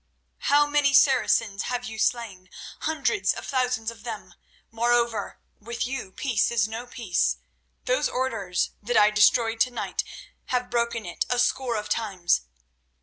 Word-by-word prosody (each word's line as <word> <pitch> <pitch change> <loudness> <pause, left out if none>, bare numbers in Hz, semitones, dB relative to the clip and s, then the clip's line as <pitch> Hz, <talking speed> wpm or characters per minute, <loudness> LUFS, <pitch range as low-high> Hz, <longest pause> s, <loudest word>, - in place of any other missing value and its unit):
How 290 +1 +4
many 290 -1 +2
Saracens 225 -7 +3
have 245 0 -2
you 220 -2 -7
slain? 205 -7 -1 0.3
Hundreds 315 +5 0
of - - -7
thousands 250 -4 -1
of 225 -2 -15
them. 220 -3 -7 0.4
Moreover, 235 -2 0 0.2
with 235 +3 -4
you 250 -6 -5
peace 235 -1 0
is 225 -3 +1
no 225 +3 -6
peace. 225 -8 0 0.5
Those - - +1
Orders 200 -8 -1
that 230 +2 0
I 210 0 +6
destroyed 225 +2 +3
tonight 245 -1 0 0.4
have 250 -1 -2
broken 235 -2 -1
it 175 - -3
a 245 - +1
score 245 0 +1
of 210 -1 -3
times. 190 - 0
235 Hz, 145 wpm, -25 LUFS, 215-250 Hz, 0.5 s, I